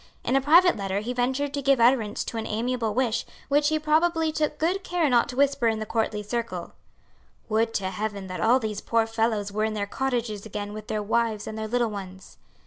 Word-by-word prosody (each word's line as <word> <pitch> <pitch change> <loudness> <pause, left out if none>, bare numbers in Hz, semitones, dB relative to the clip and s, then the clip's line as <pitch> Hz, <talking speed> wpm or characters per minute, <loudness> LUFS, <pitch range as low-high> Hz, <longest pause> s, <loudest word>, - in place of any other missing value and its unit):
In 260 - 0
a 270 - +4
private 340 +6 +6
letter 195 0 -2
he 240 +4 -3
ventured 265 +3 -1
to 285 - -2
give 275 -1 +3
utterance 230 -3 +3
to 230 - -6
an 225 - -3
amiable 230 0 -1
wish 240 -3 +1 0.3
which 290 +1 +3
he 310 0 +2
probably 320 +1 +2
took 300 -1 -1
good 365 +5 0
care 350 -3 +1
not 240 +1 +3
to 250 - -6
whisper 275 -2 +2
in 220 -1 +1
the 215 - -4
courtly 215 -1 -1
circle: 235 +2 -4 0.8
"Would 225 +1 +1
to 190 -1 -1
heaven 205 -2 -4
that 185 -1 -5
all 235 +3 +5
these 215 -4 -3
poor 230 -1 +1
fellows 225 -2 -1
were 215 +1 -1
in 220 0 -1
their 205 -1 -1
cottages 235 -3 -2
again 205 -1 -5
with 215 0 -8
their 215 -1 -2
wives 220 0 0
and 220 - -6
their 220 0 -4
little 240 0 0
ones!" 190 -2 -9
230 Hz, 220 wpm, -26 LUFS, 215-270 Hz, 0.8 s, private